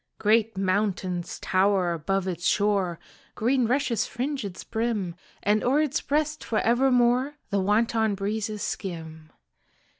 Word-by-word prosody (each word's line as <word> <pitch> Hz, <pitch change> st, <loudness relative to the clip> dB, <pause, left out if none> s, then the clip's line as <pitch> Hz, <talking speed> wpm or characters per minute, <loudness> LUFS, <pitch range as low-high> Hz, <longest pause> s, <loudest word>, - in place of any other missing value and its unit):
Great 220 Hz, 0 st, +2 dB
mountains 185 Hz, -2 st, -1 dB
tower 185 Hz, -2 st, +2 dB
above 190 Hz, +4 st, -1 dB
its 175 Hz, -1 st, -2 dB
shore, 200 Hz, -4 st, +1 dB, 0.4 s
Green 245 Hz, +1 st, +2 dB
rushes 250 Hz, -2 st, +1 dB
fringe 265 Hz, +2 st, -3 dB
its 195 Hz, -3 st, -6 dB
brim, 220 Hz, -6 st, -2 dB, 0.3 s
And 210 Hz, +1 st, +2 dB
o'er 270 Hz, +4 st, +3 dB
its 305 Hz, -1 st, 0 dB
breast 300 Hz, +1 st, -1 dB
for 225 Hz, -, -2 dB
evermore 250 Hz, +3 st, +3 dB, 0.2 s
The 200 Hz, -, +2 dB
wanton 220 Hz, +2 st, +2 dB
breezes 210 Hz, +1 st, -3 dB
skim. 160 Hz, -4 st, -5 dB
210 Hz, 125 wpm, -26 LUFS, 190-240 Hz, 0.4 s, o'er